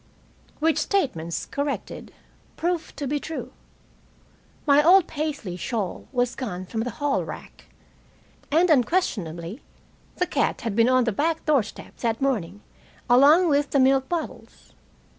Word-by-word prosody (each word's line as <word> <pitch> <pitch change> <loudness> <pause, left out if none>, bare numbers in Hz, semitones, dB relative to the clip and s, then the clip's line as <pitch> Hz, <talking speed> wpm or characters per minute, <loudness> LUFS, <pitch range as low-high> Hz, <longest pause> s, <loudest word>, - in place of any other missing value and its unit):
Which 315 0 +2
statements, 250 - -1
corrected, 285 0 -4 0.5
proved 340 -2 -2
to 285 - -3
be 290 +2 -1
true. 320 +2 -6 1.1
My 290 0 +5
old 360 +2 +6
Paisley 290 - -4
shawl 195 +1 -4
was 245 -1 0
gone 185 -8 -5
from 220 +4 -3
the 245 - -2
hallrack, 290 -1 -3 0.8
and 330 +4 +3
unquestionably 220 - 0 0.5
the 360 - 0
cat - - -1
had 230 -6 -3
been 230 +2 +4
on 255 0 +4
the 230 - 0
back 320 +9 -1
doorstep 280 -9 -1
that 230 -2 -1
morning 205 -8 -2 0.5
along 295 +8 +6
with 290 -2 +2
the 280 - +2
milk 265 0 +3
bottles. 340 -2 -6
275 Hz, 130 wpm, -24 LUFS, 225-310 Hz, 1.1 s, old